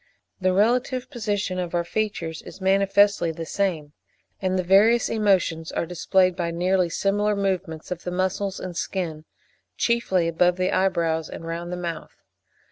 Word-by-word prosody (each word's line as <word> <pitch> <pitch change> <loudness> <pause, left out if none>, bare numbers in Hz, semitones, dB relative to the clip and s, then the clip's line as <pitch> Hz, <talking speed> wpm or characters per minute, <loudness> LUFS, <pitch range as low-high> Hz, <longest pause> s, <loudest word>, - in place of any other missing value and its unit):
The 185 -1 +2
relative 250 +6 +1
position 205 -6 -2
of 175 -1 -3
our 170 - +1
features 170 -4 -3
is - - -12
manifestly 195 -1 +3
the 165 +1 -6
same; 160 -6 -2 0.5
and 185 -1 0
the 185 - 0
various 210 +6 +4
emotions 185 -7 +1
are - - -1
displayed 185 +1 +2
by 175 -2 -2
nearly 180 +1 +1
similar 205 +4 +1
movements 185 -5 -2
of 175 -1 -4
the - - -3
muscles 185 +2 -1
and 180 -2 -6
skin, 165 -4 -3 0.5
chiefly 190 -7 +1
above 175 +2 +2
the 185 0 0
eyebrows 170 -4 +1
and 165 - -8
round 170 +1 -5
the 180 - -3
mouth. 170 -2 -6
185 Hz, 155 wpm, -24 LUFS, 170-200 Hz, 0.5 s, various